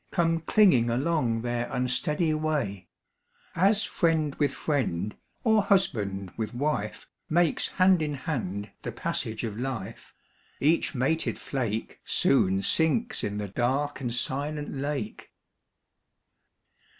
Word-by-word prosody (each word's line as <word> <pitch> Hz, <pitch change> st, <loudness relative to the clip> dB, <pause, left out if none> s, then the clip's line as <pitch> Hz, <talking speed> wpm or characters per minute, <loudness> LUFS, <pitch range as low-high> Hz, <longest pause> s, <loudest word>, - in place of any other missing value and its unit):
Come 165 Hz, -2 st, +1 dB
clinging 165 Hz, -, +4 dB
along 125 Hz, -3 st, 0 dB
their 120 Hz, 0 st, -2 dB
unsteady 150 Hz, +6 st, +1 dB
way; 145 Hz, -, -2 dB, 0.7 s
As 200 Hz, +4 st, +3 dB
friend 160 Hz, -6 st, +1 dB
with 145 Hz, -3 st, +2 dB
friend, 105 Hz, -, -1 dB, 0.3 s
or 220 Hz, -2 st, +4 dB
husband 105 Hz, -, 0 dB
with 110 Hz, +1 st, -4 dB
wife, 125 Hz, -6 st, -2 dB, 0.2 s
Makes 170 Hz, -1 st, +2 dB
hand 185 Hz, -2 st, +4 dB
in 150 Hz, -2 st, -1 dB
hand 105 Hz, -, -4 dB
the -, -, -4 dB
passage 110 Hz, +1 st, -2 dB
of 110 Hz, -1 st, -4 dB
life: 115 Hz, -5 st, -5 dB, 0.5 s
Each 155 Hz, +1 st, +2 dB
mated 150 Hz, +6 st, 0 dB
flake 115 Hz, -5 st, -3 dB
Soon 95 Hz, +1 st, +2 dB
sinks 195 Hz, +9 st, +2 dB
in 105 Hz, 0 st, -2 dB
the 105 Hz, -1 st, -4 dB
dark 135 Hz, +7 st, -1 dB
and 120 Hz, -2 st, -2 dB
silent 145 Hz, +5 st, -1 dB
lake. 145 Hz, -, -4 dB
140 Hz, 115 wpm, -27 LUFS, 115-160 Hz, 0.7 s, clinging